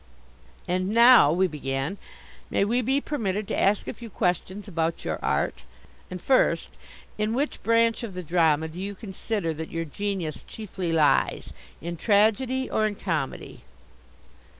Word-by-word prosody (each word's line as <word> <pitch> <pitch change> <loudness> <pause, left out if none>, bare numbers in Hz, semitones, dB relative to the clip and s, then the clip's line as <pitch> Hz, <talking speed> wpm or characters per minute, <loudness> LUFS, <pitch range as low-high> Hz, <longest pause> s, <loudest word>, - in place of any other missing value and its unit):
"And 185 +1 0
now," 235 - +7
we 180 +3 +3
began, 145 +2 -3 0.5
"may - - +1
we 240 +4 +1
be 265 +4 +1
permitted 215 -9 -2
to - - 0
ask 200 +1 +2
a - - -3
few 235 -1 -10
questions 185 +2 -2
about 165 -3 -2
your - - -2
art? - - -1 0.5
And 185 - -6
first, 260 +8 +2 0.5
in 215 +1 0
which 285 +4 -2
branch 230 +1 +2
of 220 -6 -6
the 180 - -5
drama 160 -2 +2
do 165 +3 -8
you 200 +1 -4
consider 195 -3 -3
that 160 +1 -6
your 165 0 -3
genius 185 -1 -4
chiefly 190 -5 -5
lies, 155 -2 +2 0.3
in 170 +2 -5
tragedy 225 +7 +2
or 215 - +1
in 210 - -4
comedy?" 165 -9 -4
195 Hz, 150 wpm, -26 LUFS, 165-220 Hz, 0.5 s, now